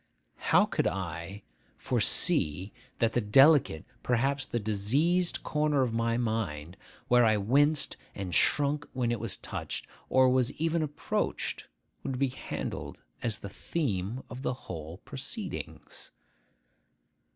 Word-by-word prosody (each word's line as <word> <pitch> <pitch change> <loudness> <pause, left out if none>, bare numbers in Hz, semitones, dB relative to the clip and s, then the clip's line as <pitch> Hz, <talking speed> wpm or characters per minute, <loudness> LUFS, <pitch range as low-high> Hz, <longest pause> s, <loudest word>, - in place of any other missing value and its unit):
How - - +6
could - - 0
I 95 +5 -4 0.3
foresee 90 +7 +3 0.2
that 115 -1 +1
the 120 - +2
delicate, 135 - +5 0.2
perhaps 135 +3 0
the 120 - -2
diseased, 135 - +1
corner 150 -2 +1
of 120 -3 -1
my 115 0 +1
mind, 100 -9 -2 0.3
where 125 0 +5
I 110 -2 +4
winced 140 +9 +2 0.2
and 95 -3 -5
shrunk 145 - +2
when 125 -2 0
it 120 - -1
was 115 -4 -3
touched, - - -5 0.2
or 130 0 +5
was 130 0 +2
even 165 +1 0
approached, 150 -1 -2 0.3
would 130 - -3
be 135 0 +1
handled 130 - -6 0.2
as 115 -3 -1
the 100 - -8
theme 115 - -3
of 125 +1 -8
the 130 - -1
whole 80 -1 -7
proceedings? 180 - -6
120 Hz, 130 wpm, -29 LUFS, 105-140 Hz, 0.3 s, How